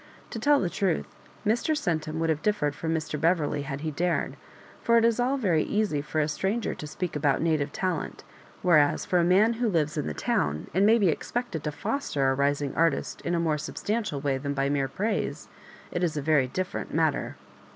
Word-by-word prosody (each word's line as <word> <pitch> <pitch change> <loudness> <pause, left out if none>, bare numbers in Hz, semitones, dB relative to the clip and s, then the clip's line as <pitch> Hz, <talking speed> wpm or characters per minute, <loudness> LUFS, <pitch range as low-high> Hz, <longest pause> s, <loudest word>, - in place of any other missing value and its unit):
To 230 - -4
tell 285 +4 +4
the 180 - 0
truth, 180 -1 0 0.4
Mr. 240 +8 +1
Centum 160 - -2
would 165 0 +1
have 150 -1 -2
differed 180 -8 +1
from 160 +3 -3
Mr. 155 -2 -2
Beverley 160 -4 +1
had 140 -1 -5
he 155 0 -2
dared; 175 +3 -1 0.5
for 235 0 +4
it 230 - +4
is 230 0 +2
all 255 +3 +2
very 180 - +2
easy 205 -8 0
for 150 +2 -3
a 150 - +2
stranger 195 +9 -1
to 150 - -7
speak 175 +3 -4
about 145 -2 +2
native 155 -3 +1
talent; 185 -2 -3 0.4
where 175 -4 +6
as 145 -1 +1
for 180 - +2
a - - +3
man 195 +6 +4
who 235 - +2
lives 155 -5 0
in - - -1
the 75 - -4
town, 75 +1 0
and 195 +4 +4
may 225 +2 +6
be 200 -6 +3
expected 235 0 -3
to 150 - -1
foster 145 - -1
a - - +2
rising 140 +1 0
artist 165 0 0
in 175 - -1
a - - +1
more 155 -3 +1
sub - - -6
stantial 210 -10 -2
way 135 -2 0
than 140 +1 -3
by 140 0 +1
mere 140 -1 +1
praise, 205 - -2 0.4
it 175 - -2
is 160 -3 0
a - - -1
very 145 -4 +3
dif 185 +8 -3
ferent - - -5
matter. - - 0
160 Hz, 220 wpm, -27 LUFS, 145-200 Hz, 0.5 s, where